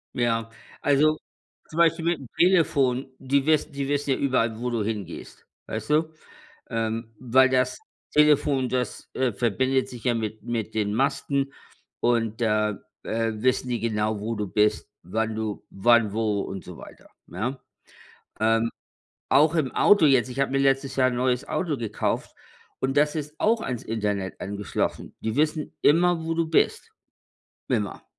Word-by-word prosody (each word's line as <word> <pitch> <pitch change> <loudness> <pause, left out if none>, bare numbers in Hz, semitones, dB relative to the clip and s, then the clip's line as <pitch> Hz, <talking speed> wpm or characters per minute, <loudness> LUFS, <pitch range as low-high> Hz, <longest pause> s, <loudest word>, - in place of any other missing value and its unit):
Ja. 115 -2 0 0.3
Also, 150 +2 +3 0.5
zum 155 - -9
Beispiel 165 -1 +3
mit 170 -1 +1
dem 135 - -10
Telefon. 140 -8 +3
Die 135 +1 +1
wiss 155 -1 +2
die 140 -1 -3
wissen 145 0 0
ja 130 - +2
überall, 120 -5 +1
wo 125 +1 -2
du 115 -3 -1
hingehst. 105 -3 -6 0.2
Weißt 110 0 -5
du? 155 +1 +2 0.6
Ähm, 115 0 -3
weil 130 +1 +4
das 130 0 +1 0.3
Telefon, 145 -3 +3
das, 125 -3 -3
äh, 130 -2 +1
verbindet 130 +5 0
sich 120 -3 -10
ja 120 -2 +2
mit 110 -1 -4
mit 115 -2 -3
den 105 -1 0
Masten 140 +2 0 0.5
und 115 -2 +1
da, 105 -2 +2 0.3
äh, 115 0 -1
wissen 125 +3 0
die 120 - -1
genau, 110 -1 -1
wo 110 +2 -2
du 105 -2 -3
bist, 105 +3 +1
wann 110 +5 -2
du 110 -2 -4
wann, 115 +1 +3
wo 110 -2 0
und 95 - -6
so 90 - -10
weiter, - - -13 0.2
ja? 130 +4 -4 0.8
Ähm, 115 +1 +2 0.6
auch 150 +4 +4
im 140 -5 +1
Auto 205 -7 +5
jetzt. 130 -2 +3
Ich 130 +2 -4
habe 140 -1 +1
mir 135 - +2
letztes 135 0 +1
Jahr 130 -1 +4
'n 120 - -3
neues 125 0 0
Auto 165 -6 -1
gekauft. 115 -4 -2 0.5
Und 135 +1 -1
das 150 +1 +3
ist 150 -1 -5
auch 225 +1 +3
ans 125 - -4
Internet 105 -3 -3
angeschlossen. 100 0 -3
Die 110 -1 -2
wissen 155 +1 0
immer, 170 +1 +4
wo 165 - -1
du 165 0 0
bist. 160 - +1 0.8
Immer. 105 -6 -2
125 Hz, 160 wpm, -25 LUFS, 110-140 Hz, 0.8 s, Auto